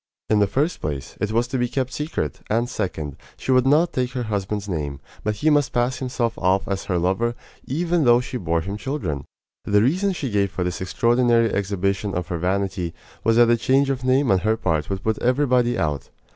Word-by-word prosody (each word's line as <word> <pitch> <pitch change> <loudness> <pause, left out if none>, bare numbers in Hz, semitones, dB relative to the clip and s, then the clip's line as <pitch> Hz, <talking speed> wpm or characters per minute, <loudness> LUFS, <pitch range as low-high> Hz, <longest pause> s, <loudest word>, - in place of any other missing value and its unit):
In 105 - +4
the 100 - +4
first 150 - -1
place, 70 -2 -4
it 105 - 0
was 115 +2 +1
to 130 -1 -1
be 125 - +1
kept 130 0 -2
secret; 150 - -3
and 115 +3 +1
second, 85 - -4 0.2
she - - -2
would 130 0 +4
not 155 +5 +4
take 125 -1 -1
her 125 -2 -2
husband's 105 -1 -3
name, 75 -7 -3 0.2
but 105 0 0
he 155 +9 +2
must 145 -3 +2
pass 120 +2 +1
himself 125 -3 -1
off 95 +1 +2
as 100 -1 -2
her 90 - 0
lover, 95 +7 0 0.3
even 170 +4 +1
though 120 -2 +6
she 125 0 -4
bore 85 -6 0
him 100 +5 -5
children. 100 - -3 0.4
The 105 +1 +3
reason 185 - +2
she 140 -8 -4
gave 100 -1 +2
for 90 - -3
this 90 0 -3
extraordinary 115 +4 +2
exhibition 100 0 -1
of 90 -1 -3
her 85 - -2
vanity 90 -1 -1 0.3
was 115 0 +3
that 120 0 +6
a 120 - +4
change 135 +3 +2
of 130 -2 -3
name 130 0 +3
on 95 - +4
her 110 +3 +1
part 80 -7 -1
would 95 -1 -3
put 110 -1 0
everybody 125 -2 +2
out. 75 -4 -2
110 Hz, 215 wpm, -23 LUFS, 95-130 Hz, 0.4 s, though